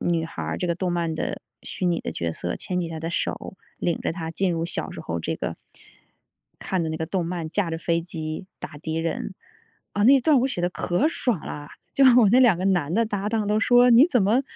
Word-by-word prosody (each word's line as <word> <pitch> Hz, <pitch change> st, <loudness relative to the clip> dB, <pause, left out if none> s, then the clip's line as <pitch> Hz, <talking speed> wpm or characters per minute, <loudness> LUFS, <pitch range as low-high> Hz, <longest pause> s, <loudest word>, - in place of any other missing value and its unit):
女 165 Hz, -2 st, 0 dB
孩 165 Hz, -, -7 dB
儿， -, -, -3 dB
这 180 Hz, -, -2 dB
个 170 Hz, -, 0 dB
动 180 Hz, 0 st, -2 dB
漫 170 Hz, -2 st, -1 dB
的 -, -, -3 dB, 0.2 s
虚 185 Hz, -, -3 dB
拟 170 Hz, -1 st, +1 dB
的 -, -, -4 dB
角 85 Hz, -1 st, -3 dB
色， 85 Hz, +2 st, -3 dB
牵 180 Hz, -1 st, -2 dB
起 170 Hz, -, -3 dB
他 160 Hz, -1 st, -6 dB
的 165 Hz, -, -3 dB
手， 185 Hz, -, -3 dB, 0.2 s
领 170 Hz, -, -1 dB
着 -, -, -1 dB
他 165 Hz, -2 st, -5 dB
进 180 Hz, +1 st, 0 dB
入 165 Hz, 0 st, -1 dB
小 -, -, -3 dB
时 -, -, -8 dB
候 85 Hz, 0 st, -4 dB
这 -, -, -3 dB
个， -, -, -4 dB, 1.0 s
看 185 Hz, -2 st, -2 dB
的 160 Hz, -, -2 dB
那 160 Hz, -, -3 dB
个 160 Hz, 0 st, -3 dB
动 180 Hz, 0 st, -1 dB
漫， 170 Hz, -2 st, -4 dB
驾 180 Hz, 0 st, -1 dB
着 165 Hz, -, -3 dB
飞 170 Hz, 0 st, 0 dB
机 160 Hz, 0 st, -6 dB
打 -, -, -8 dB
敌 160 Hz, +1 st, -4 dB
人。 165 Hz, -, -3 dB, 0.6 s
啊， 205 Hz, -, 0 dB
那 270 Hz, +2 st, +7 dB
段 295 Hz, +3 st, +4 dB
儿 -, -, +4 dB
我 265 Hz, -, +1 dB
写 180 Hz, -, -2 dB
得 175 Hz, -, +1 dB
可 180 Hz, +9 st, 0 dB
爽 245 Hz, -, 0 dB
啦， 145 Hz, 0 st, -8 dB, 0.2 s
就 275 Hz, -, +5 dB, 0.2 s
我 215 Hz, -, +5 dB
那 255 Hz, +2 st, +6 dB
2 225 Hz, -9 st, +5 dB
个 185 Hz, -, -1 dB
男 175 Hz, -5 st, +1 dB
的 230 Hz, +2 st, +3 dB
搭 205 Hz, -1 st, -2 dB
档 215 Hz, -2 st, -1 dB
都 210 Hz, -, +2 dB
说 245 Hz, +1 st, +5 dB
你 245 Hz, +7 st, +8 dB
怎 250 Hz, -, +2 dB
么 225 Hz, +8 st, +3 dB
175 Hz, 265 characters per minute, -24 LUFS, 165-210 Hz, 1.0 s, 你